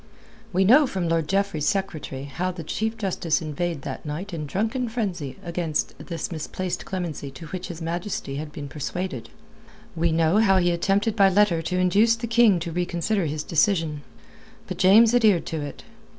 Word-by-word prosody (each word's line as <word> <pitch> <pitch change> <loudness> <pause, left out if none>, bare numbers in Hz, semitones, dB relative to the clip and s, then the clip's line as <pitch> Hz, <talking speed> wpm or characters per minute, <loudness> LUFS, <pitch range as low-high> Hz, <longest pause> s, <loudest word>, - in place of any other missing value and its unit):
We 190 +1 +2
know 270 +8 +6
from 185 -6 -2
Lord 165 -2 +1
Jeffreys's 195 -5 +1
secretary 185 -9 -3
how 175 +6 -3
the 175 -2 -6
Chief 220 +7 -2
Justice 180 -6 0
inveighed 160 -1 -3
that 135 - -6
night 170 +6 -5
in 150 -3 -4
drunken 225 - -1
frenzy 180 - -3
against 170 -3 -2
this 170 -1 -5
misplaced 175 +3 -4
clemency 170 -7 -4
to 135 +5 -10
which 185 +1 -5
His 170 -3 -7
Majesty 170 -4 -3
had 150 0 -5
been 145 -1 -7
persuaded. 140 -3 -4 0.7
We 165 0 +1
know 165 +3 +3
how 195 -4 +4
he 175 -1 +3
attempted 200 +5 +1
by 195 -3 +6
letter 190 -3 +3
to 180 +3 -2
induce 200 +6 +4
the 230 +1 -5
King 230 -5 +4
to 170 0 -4
reconsider 175 +2 -1
his 150 +1 -3
decision. 165 -4 +1 0.6
But - - -6
James 220 +5 +6
adhered 215 -8 +4
to 160 -2 -3
it. 145 -1 -7
175 Hz, 175 wpm, -24 LUFS, 160-200 Hz, 0.7 s, know